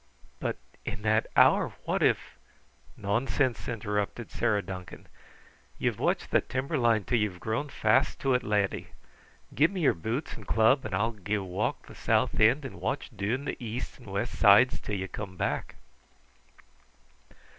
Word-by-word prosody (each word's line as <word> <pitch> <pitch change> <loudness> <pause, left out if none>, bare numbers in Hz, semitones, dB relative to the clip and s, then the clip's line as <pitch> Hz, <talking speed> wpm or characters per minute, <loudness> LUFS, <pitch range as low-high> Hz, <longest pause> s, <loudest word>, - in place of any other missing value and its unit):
"But - - -2 0.3
in 100 +1 -5
that 110 0 +2
hour, - - +5
what - - -1
if - - +1 0.3
?" - - -30
"Nonsense!" 120 +4 0
interrupted 105 0 -3
Sarah 105 -4 +1
Duncan. 90 -2 -8 0.7
"Ye've - - -1
watched - - 0
that - - +2
timber 135 +5 -2
line 120 -5 +3
until 120 +4 0
ye're 105 -4 -1
grown 110 +10 -2
fast 130 +4 +2
to 135 -1 +2
it, 125 - +2
lad. 105 -3 0 0.7
Give 155 +4 +4
me 195 -2 -4
your 145 - +4
boots 110 - -3
and - - -11
club 110 +4 +3
and 100 -4 -2
I'll 115 +5 +1
gae 105 -1 -2
walk 95 +1 -2
the - - -12
south - - +1
end 120 +7 +4
and 100 -9 -8
watch 135 +9 -2
doon 110 +8 -2
the 125 - -4
east 120 +4 -5
and 120 - -15
west 100 +4 -3
sides 110 +5 +7
until 105 - -4
ye 95 -1 -3
come 95 -2 -7
back." - - -2
110 Hz, 165 wpm, -29 LUFS, 100-125 Hz, 0.7 s, sides